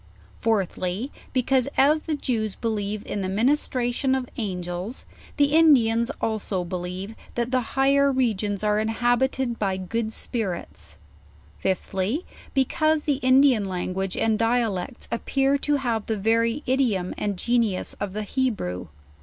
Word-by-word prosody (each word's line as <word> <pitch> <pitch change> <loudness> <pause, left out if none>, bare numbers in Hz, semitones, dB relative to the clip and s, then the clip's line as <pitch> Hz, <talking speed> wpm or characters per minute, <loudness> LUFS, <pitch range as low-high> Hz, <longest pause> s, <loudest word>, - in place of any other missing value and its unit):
Fourthly, 200 +2 -1 0.2
because, 260 0 +2
as 295 +3 +5
the 310 -1 -2
Jews 220 -7 -2
believe 210 -2 -2
in 205 - -3
the 185 - -2
ministration 250 +3 +1
of 260 -1 -2
Angels, 180 +1 -4 0.3
the 285 0 +3
Indians 240 -8 +5
also 210 -4 -1
believe,, 180 +3 -5 0.2
that 240 +1 -1
the 255 -1 +2 0.2
higher 280 +1 +4
regions 215 -6 0
are 210 0 +2
inhabited 240 +2 +1
by 195 -2 0
good, 220 +5 -2
170 220 +2 -4
JOURNAL 190 -6 -1
OF - - -14
spirits. - - -11 0.6
Fifthly, 190 - -1 0.3
because 310 +3 +2
the 290 -3 +1
Indian 260 -3 +5
language 185 0 -3
and 220 -1 +1
dialects, 230 -2 0
appear 270 +4 +1
to 295 +1 +1
have 235 -6 -1
the 220 - -1
very 230 +6 +1
idiorn 240 -9 +1
and 205 -2 -1
genius 230 -3 0
of 200 -2 -3
the 215 +1 -3
Hebrew. 210 - -2
230 Hz, 140 wpm, -25 LUFS, 200-265 Hz, 0.6 s, as